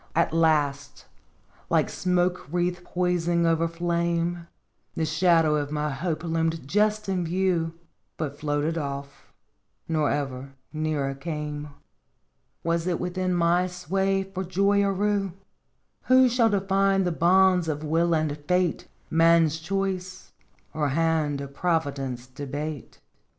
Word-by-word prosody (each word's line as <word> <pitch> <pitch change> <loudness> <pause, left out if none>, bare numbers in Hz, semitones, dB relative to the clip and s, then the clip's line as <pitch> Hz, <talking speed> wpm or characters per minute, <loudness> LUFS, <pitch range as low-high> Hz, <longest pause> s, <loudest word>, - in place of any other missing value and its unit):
" - - -32
At - - -12
last, 145 -3 +1 0.6
like - - +3
smoke 180 -5 0
wreath 175 0 -1
poising 175 -1 0
over 165 0 +2
flame, 170 0 -1 0.5
The 160 - 0
shadow 160 -1 +3
of 145 -1 -2
my 150 0 -1
hope 160 +3 -3
loomed 165 -3 -1
just 210 +4 +1
in 185 -2 0
view, 170 -1 0 0.4
But 145 -3 -3
floated 150 +2 -1
off, 140 -1 -7 0.6
nor 155 -3 +1
ever 135 -1 -3 0.2
nearer 155 -3 -1
came. 150 0 -5 1.0
Was 170 +1 0
it 175 -2 0
within 180 0 -1
my 175 +1 +2
sway 195 +2 -1
for 190 0 -5
joy 200 +3 +2
or 200 0 +2
rue? 200 -2 0 0.7
Who 255 0 +6
shall 235 -1 +3
define 195 -1 +2
the 175 - 0
bounds 180 +1 +4
of 155 -1 -2
will 165 +2 +2
and 155 -2 0
fate, 180 -2 +1 0.2
Man's 165 -1 +4
choice, 185 +1 -3 0.4
or 150 -2 0
hand 155 -1 +1
of 140 0 -8
Providence 140 -7 -1
debate? 145 +2 -6
165 Hz, 130 wpm, -26 LUFS, 150-180 Hz, 1.0 s, Who